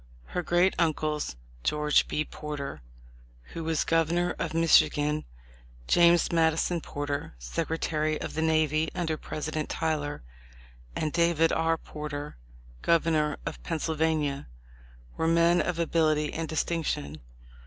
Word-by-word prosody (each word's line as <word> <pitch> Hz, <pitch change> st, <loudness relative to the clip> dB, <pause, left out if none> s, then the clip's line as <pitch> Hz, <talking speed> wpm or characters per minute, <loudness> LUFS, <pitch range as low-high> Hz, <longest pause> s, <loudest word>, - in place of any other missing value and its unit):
Her 180 Hz, -, 0 dB
great 175 Hz, +2 st, +3 dB
uncles, 155 Hz, -, 0 dB, 0.3 s
George 150 Hz, -, +2 dB
B. 150 Hz, -, -1 dB
Porter, 145 Hz, -, -6 dB, 0.7 s
who 165 Hz, -, -4 dB
was 160 Hz, -1 st, 0 dB
governor 165 Hz, +2 st, +1 dB
of -, -, -2 dB
Michigan, 155 Hz, -2 st, +3 dB, 0.6 s
James 170 Hz, -1 st, +5 dB
Mad 165 Hz, -1 st, +4 dB
ison 170 Hz, +1 st, -1 dB
Porter, 145 Hz, -, -4 dB
secretary 155 Hz, -, -2 dB
of -, -, -5 dB
the 160 Hz, -, -2 dB
navy 155 Hz, -1 st, +2 dB
under 165 Hz, -3 st, -1 dB
President 155 Hz, 0 st, -4 dB
Tyler, 150 Hz, -, -2 dB, 0.7 s
and 155 Hz, -1 st, -2 dB
David 170 Hz, -1 st, +3 dB
R. 165 Hz, 0 st, +1 dB
Porter, 150 Hz, -2 st, -6 dB, 0.5 s
governor 160 Hz, -3 st, +2 dB
of -, -, -5 dB
Pennsyl 160 Hz, -1 st, -2 dB
vania, 155 Hz, -3 st, 0 dB, 0.7 s
were 160 Hz, -, +1 dB
men 170 Hz, +1 st, +4 dB
of 180 Hz, -, -2 dB
ability 155 Hz, -2 st, +1 dB
and 160 Hz, -1 st, -3 dB
distinction. 150 Hz, -, -2 dB
160 Hz, 120 wpm, -28 LUFS, 150-165 Hz, 0.7 s, James